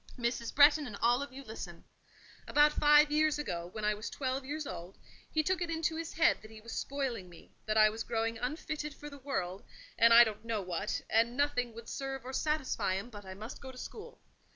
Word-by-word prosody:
Mrs. 235 -1 -2
Bretton 290 0 +6
and 205 - -7
all 240 +3 +3
of 280 - -5
you 270 +1 -9
listen: 190 -8 -8 0.6
About 295 0 +5
five 295 0 +6
years 305 0 +3
ago, 175 -12 -4
when 215 +1 -4
I 210 - +3
was 210 +1 -5
twelve 265 0 -2
years 295 +3 -4
old, 180 -1 -7 0.3
he 310 - +1
took 370 +3 0
it 345 - -1
into 325 0 -1
his 330 0 -5
head 320 - +3
that 215 - -12
he 220 0 -11
was 230 +1 -10
spoiling 255 -9 -3
me; 170 - -16 0.2
that 215 0 +1
I 215 0 +8
was 220 +1 -6
growing 225 -1 -2
unfitted 300 +2 -4
for 295 0 -9
the 285 - -10
world, 190 -9 -3 0.4
and 230 0 +7
I 235 +1 +10
don't 220 -2 -4
know 225 -3 -2
what, 185 +3 -2
and 230 +3 +2
nothing 250 -5 0
would 230 0 -10
serve 270 -2 -5
or 260 - -6
satisfy 300 -10 0
him, 210 +6 -5
but 205 -2 -10
I 190 - -7
must 220 +6 -8
go 265 -1 -8
to 255 - -14
school. 465 - -9
250 Hz, 225 wpm, -32 LUFS, 215-295 Hz, 0.6 s, I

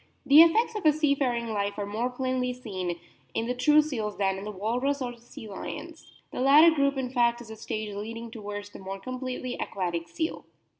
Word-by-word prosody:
The 285 +3 +9
effects 445 +8 +4
of 425 - -4
a - - +8
seafaring 275 -6 +1
life 205 -1 -2
are 205 - -2
more 220 +5 -2
plainly 255 0 -1
seen 185 -8 -4 0.4
in 225 - 0
the 245 - -1
true 295 +5 +5
seals 225 -9 -3
than 195 -1 0
in 195 - -8
the - - -4
Walrus 245 +8 -1
or 250 -2 -3
the 240 -1 -15
Sea 230 -2 -11
lions. 195 -2 -8 0.2
The - - -5
latter 300 +5 +7
group 280 -2 +1
in 255 -2 -2
fact 240 -2 +2
is 230 -2 -10
a - - -7
stage 215 -1 -5
leading 230 +3 -6
towards 205 -2 -7
the - - -11
more 195 0 -6
completely 255 +2 -5
aquatic 175 -3 -3
seal. 320 0 -3
240 Hz, 205 wpm, -27 LUFS, 205-270 Hz, 0.4 s, The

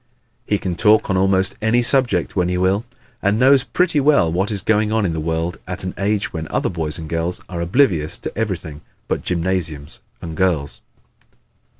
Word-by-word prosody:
He 105 - +2
can 95 -3 -3
talk 105 +3 +3
on - - +1
almost 95 0 +1
any 115 +2 +2
subject 120 - +1
when 90 -2 +1
he 90 - 0
will 95 +5 +1 0.4
and 100 +1 +2
knows 130 +2 +5
pretty 175 -4 +1
well 140 - +3
what 95 +4 0
is 100 -3 -3
going 110 -1 +2
on 110 -2 +1
in 85 - -1
the 80 - -3
world 80 +2 -2
at 90 0 -6
an 90 - -4
age 100 +1 -1
when 80 -2 -4
other - - -1
boys 80 -3 -4 0.5
are 85 -2 -5
oblivious 85 - +1
to - - -7
everything 90 -9 -4 0.3
but - - -1
gymnasiums 85 -4 -3 0.2
and 80 -1 -7
girls. 80 -7 0
95 Hz, 180 wpm, -20 LUFS, 85-110 Hz, 0.5 s, knows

